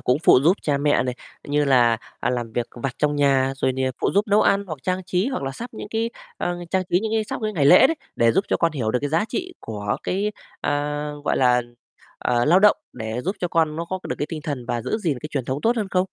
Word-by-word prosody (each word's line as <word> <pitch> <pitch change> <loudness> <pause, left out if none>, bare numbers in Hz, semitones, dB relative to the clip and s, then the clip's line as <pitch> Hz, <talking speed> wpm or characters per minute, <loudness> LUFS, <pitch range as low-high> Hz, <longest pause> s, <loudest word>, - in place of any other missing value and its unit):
cũng 125 +3 +1
phụ 150 - +6
giúp 175 +6 +4
cha 145 -2 +1
mẹ 145 +1 +2
này, 125 -1 -2 0.3
như 145 +1 +2
là, 120 -4 +4 0.2
à, - - 0
làm 120 -2 -3
việc 120 0 -1 0.2
vặt 135 -3 -2
trong 150 0 +1
nhà, 135 -2 +3
rồi 130 - +1
nìa 130 0 -1
phụ - - +1
giúp 205 +2 +3
nấu 205 +1 +4
ăn 200 0 +2
hoặc 155 -4 -6
trang 185 +3 -2
trí 185 +2 0
hoặc 265 - -3
là 135 - -2
sắp 235 - -7
những, 205 - -7
cái, 225 +1 -1 0.3
ờ, 175 - -2 0.2
trang 190 -1 +1
trí 180 - +3
những 220 0 -3
cái 220 -1 +1
sắp - - -5
cái 215 0 -1
ngày 150 -7 +1
lễ 185 - +8
đấy, 325 +3 -1 0.2
để 115 -1 +4
giúp 195 - +2
cho - - +2
con 165 -2 +1
hiểu 120 -7 -1
được 125 - +1
cái 145 - -1
giá 165 +6 +2
trị 365 0 -4
của 105 -1 -3
cái, 205 +3 -1 0.3
à, 145 +1 -1
gọi - - +1
là, 125 -1 +4 0.6
ờ, 120 0 +1
lao 175 +5 +5
động, 210 +1 +5 0.2
để 110 0 -4
giúp 190 +9 -2
cho 175 - -1
con 160 -2 +1
nó 170 +1 -3
có 185 +2 -4
được - - -2
cái 145 - 0
tinh 155 -3 -5
thần 140 -6 -4
và 120 - -2
giữ 220 - -2
gìn 165 - -1
cái 150 - -6
truyền 135 -4 -2
thống 130 +3 -3
tốt 235 +2 +2
hơn 215 -4 -1
không? 185 -1 +2
150 Hz, 275 wpm, -23 LUFS, 130-190 Hz, 0.6 s, lễ